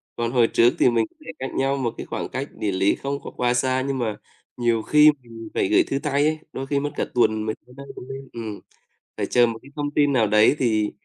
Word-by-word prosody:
Còn 120 0 -2
hồi 120 -3 +4
trước 115 +1 +4
thì - - +5
mình 115 -1 +2 0.2
thể 165 - -6
cách 130 - -4
nhau 135 +1 +1
một 120 -4 -2
cái - - -6
khoảng - - -4
cách - - -4
địa 105 - -2
lý 95 +2 +2
không 140 0 -4
có - - -8
quá 125 0 0
xa, 130 +1 +1
nhưng 135 -1 -1
mà 110 -3 -1 0.4
nhiều 120 -2 +1
khi 150 +3 +6
mình 115 -2 -10
phải - - +1
gửi - - +4
thư 135 - -2
tay 145 0 +1
ấy, 155 0 0
đôi 135 +1 -5
khi 140 0 +1
mất 145 0 -3
cả - - -1
tuần 110 -3 +2
mới 110 - -2
tới 125 - -18
nơi 140 - -9
cũng 125 - -10
nên, 135 0 -8
ừm. 110 -3 -6 0.6
Phải - - -1
chờ 120 -1 +4
một 115 -1 -5
cái - - -15
thông 145 -1 -2
tin 145 -1 +2
nào 115 -4 +3
đấy 105 +6 +5
thì 110 -4 +1
125 Hz, 260 wpm, -23 LUFS, 115-140 Hz, 0.6 s, khi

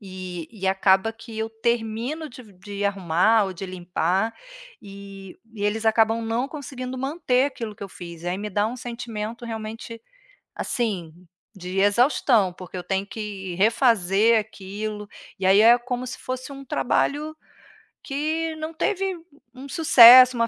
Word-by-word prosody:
e 185 -4 -7
e 200 -4 -5
acaba 190 +2 +3
que 225 0 -12
eu 220 0 -2
termino 235 +6 -2
de 250 +1 -12
v 215 -4 -18
de 200 +2 -6
arrumar 200 +3 +2
ou 190 - -5
de 185 +2 -7
limpar, 185 +3 -1 0.5
e 195 -1 -11 0.2
e 205 -2 -4
eles 215 +2 -1
acabam 225 +1 +3
não 230 +3 -1
conseguindo 260 -3 -7
manter 270 -1 +1
aquilo 230 -6 -6
que 205 - -12
eu 200 - -6
fiz. 170 -2 -10
Aí, 175 +1 -1
me 210 +1 -5
dá 205 +2 +1
um 235 +3 -5
sentimento, 235 -2 -6
realmente, 225 0 -7 0.5
assim, 195 -9 -3 0.4
de 185 +1 -5
exaustão, 215 -1 +3
porque 180 0 -10
eu 180 - -6
tenho 195 0 -2
que 200 -4 -6
refazer 220 -1 +3
aquilo 210 0 -6 0.3
e, 190 - -5
aí, 190 +2 +6
é 230 +2 +7
como 245 +1 -4
se - - -6
fosse 255 +2 -6
um 275 0 -10
trabalho 295 +4 -1 0.7
que 315 +3 -2
não 315 +1 -6
teve 385 +2 -1
u - - -16 0.3
um 265 +2 -10
sucesso, 255 -4 +8
uma 230 0 +2
220 Hz, 160 wpm, -24 LUFS, 195-250 Hz, 0.7 s, sucesso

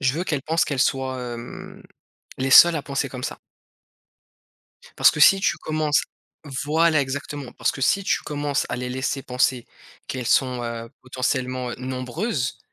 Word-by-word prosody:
je 135 -1 +2
veux 170 +4 -3
qu'elles 150 -6 -2
pensent 165 +2 +1
qu'elles 140 -3 -3
soient, 130 -1 0
hem, 120 +1 -10 0.6
les 135 +1 -1
seules 170 +4 +9
à 145 - -3
penser 140 -1 -2
comme 125 -1 -7
ça. - - -5 1.6
Parce - - +7
que 150 - -5
si 195 +5 +7
tu 205 - +1
commences 155 -1 0 0.6
voilà 160 0 +3
exactement! 140 0 -5
Parce - - 0
que - - -9
si 195 +9 +2
tu - - +1
commences 145 -1 -2
à 120 - -3
les 125 0 -4
laisser 130 +1 -2
penser 125 -1 0 0.4
qu'elles 125 -3 -4
sont, 125 -2 +2
heu, 115 0 -5
potentiellement, 130 -1 -2
heu, - - -4
nombreuses 130 - -3
135 Hz, 165 wpm, -23 LUFS, 125-150 Hz, 1.6 s, seules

